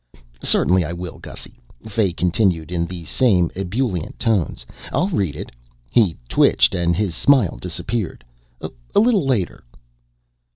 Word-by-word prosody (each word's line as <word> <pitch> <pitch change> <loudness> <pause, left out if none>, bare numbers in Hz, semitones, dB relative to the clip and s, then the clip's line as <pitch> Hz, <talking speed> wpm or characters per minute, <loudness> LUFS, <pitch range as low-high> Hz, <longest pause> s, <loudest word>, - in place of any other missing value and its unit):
_" - - -22 0.2
"Certainly 90 0 +4
I 85 +2 -4
will, 85 -1 -7
Gussy," - - -11 0.3
Fay 105 -3 +1
continued 90 -2 0
in 85 -1 -1
the 85 -2 -7
same 90 - +2
ebullient 95 - -2
tones. 95 - 0 0.3
"I'll 185 - +1
read 95 - -1
it - - -7 0.2
" - - -36
he 100 -9 +3
twitched - - +4
and 85 -2 +1
his 100 -2 -1
smile 115 - +3
disappeared 110 -6 -3 0.7
"a - - +7
little 210 - +3
later." 115 -9 -1
90 Hz, 140 wpm, -20 LUFS, 85-115 Hz, 0.7 s, a